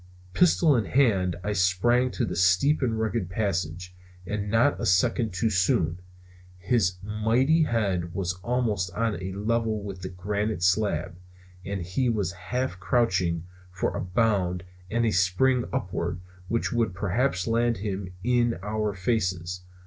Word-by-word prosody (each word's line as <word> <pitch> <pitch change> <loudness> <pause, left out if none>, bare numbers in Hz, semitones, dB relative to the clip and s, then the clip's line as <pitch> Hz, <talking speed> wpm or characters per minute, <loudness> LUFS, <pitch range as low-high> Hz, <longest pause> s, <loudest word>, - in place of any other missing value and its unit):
Pistol 165 - +4
in 115 -4 +1
hand 100 -9 +2
I 105 - -1
sprang 105 +7 +2
to - - 0
the - - -4
steep 95 +13 +3
and 115 -4 0
rugged 110 -4 -1
passage. 90 -2 -2 0.3
And 105 +1 -3
not 115 +7 +2
a - - -1
second 110 +4 +2
too 95 +5 0
soon. 90 -3 +1 0.6
His 90 -1 +1
mighty 115 +9 +2
head 95 - -1
was 90 -2 -1
almost 110 -7 0
on 110 -3 -1
a 95 +1 -4
level 110 +1 -1
with 100 -2 -7
the 95 - -5
granite 100 +1 -2
slab. 90 -1 +1 0.5
And 95 -2 -4
he 95 +9 0
was 105 -6 0
half 110 +3 -3
crouching 95 -4 +1 0.3
for 95 - -2
a - - -2
bound 90 -2 0 0.3
and 115 +2 +1
a 110 - +2
spring 100 +8 +2
upward, - - -2 0.3
which 115 +3 -1
would 115 -6 0
perhaps 100 +1 0
land 115 0 +1
him 95 -2 -4
in 120 -2 +2
our 105 -1 -2
faces. 90 -3 -1
100 Hz, 150 wpm, -26 LUFS, 90-115 Hz, 0.6 s, Pistol